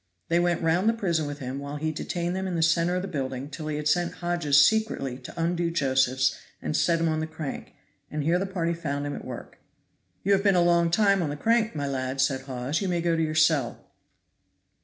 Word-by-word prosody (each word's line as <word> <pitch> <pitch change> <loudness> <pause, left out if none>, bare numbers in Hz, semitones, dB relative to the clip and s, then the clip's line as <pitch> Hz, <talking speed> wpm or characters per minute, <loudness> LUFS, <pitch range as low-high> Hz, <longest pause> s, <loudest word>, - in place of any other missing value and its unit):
They 170 +1 +3
went 175 -1 +1
round 170 +6 +3
the - - +3
prison 170 -9 -1
with 145 0 -5
him, 135 -1 -5
while 140 +1 -6
he 155 +1 -2
detained 175 +2 -3
them 190 0 -2
in 180 - -3
the 165 - +1
center 170 +2 +2
of 180 - -1
the - - -3
building 135 -3 -4
till 155 +1 -6
he 155 - -2
had 150 0 -2
sent 175 +2 +1
Hodges 170 -5 +2
secretly 215 - 0
to 130 - -10
undo 170 +1 0
Josephs 130 -4 +1 0.2
and 155 - -3
set 165 +1 +2
him 165 - +1
on 155 -1 0
the 160 - -2
crank; 160 -3 -7 0.3
and 150 -1 -3
here 170 +4 +2
the 195 - -2
party 170 -3 -1
found 145 -4 -3
him 145 - -3
at - - -7
work. - - -9 0.6
"You 200 - +1
have 195 -1 +4
been 200 -2 +3
a 175 - +4
long 170 -1 +3
time 200 +1 +3
on 160 - -1
the 145 - -4
crank, 225 +1 +1
my 145 -1 -2
lad," 130 -1 -3
said 135 0 +1
Hawes, 130 +4 -3
"you 195 - -1
may 175 -1 0
go 170 0 +1
to 165 - 0
your 155 -1 -1
cell." 155 -6 +1
165 Hz, 240 wpm, -26 LUFS, 145-175 Hz, 0.6 s, have